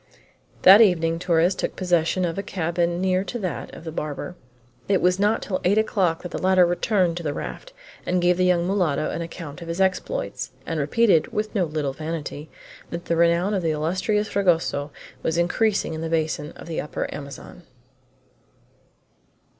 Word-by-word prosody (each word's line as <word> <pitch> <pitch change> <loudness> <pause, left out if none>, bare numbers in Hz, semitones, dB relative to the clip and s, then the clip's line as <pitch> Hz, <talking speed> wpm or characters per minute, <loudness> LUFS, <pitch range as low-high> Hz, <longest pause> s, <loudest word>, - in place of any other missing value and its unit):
That 195 +4 +9
evening 165 -5 +3
Torres 175 +1 +2
took - - -3
possession 180 0 +1
of 165 -1 -2
a 195 - -2
cabin 175 -2 -1
near 185 0 +1
to 240 - -4
that 185 -6 -4
of - - -11
the 160 - -6
barber. 155 +3 -5 0.5
It 195 -2 +4
was 180 +1 +2
not 210 +2 +2
till 185 -3 -3
eight 195 +4 +3
o'clock 190 -6 +1
that 180 - -6
the - - -4
latter 185 -1 +5
returned 175 0 +1
to - - -4
the 145 -2 -2
raft, - - -6 0.3
and 180 - 0
gave 175 0 +3
the 185 - +2
young 175 -1 +3
mulatto 175 -6 0
an - - -3
account 165 -2 -8
of 170 - -8
his 170 +2 -4
exploits, 190 - -1
and 165 -2 -2
repeated, 165 +3 +3
with 215 -1 -2
no 195 -5 +1
little 150 -3 -2
vanity, 155 0 -5 0.4
that 170 0 -6
the 170 - 0
renown 170 +4 +3
of 195 - 0
the 165 - 0
illustrious 185 +7 0
Fragoso 165 -7 +1 0.3
was 160 +1 -1
increasing 195 +2 +1
in 160 - -5
the 165 - -3
basin 155 -2 -1
of - - -11
the 165 -1 -3
Upper 150 - -4
Amazon. 140 +4 -9
175 Hz, 180 wpm, -24 LUFS, 160-190 Hz, 0.5 s, That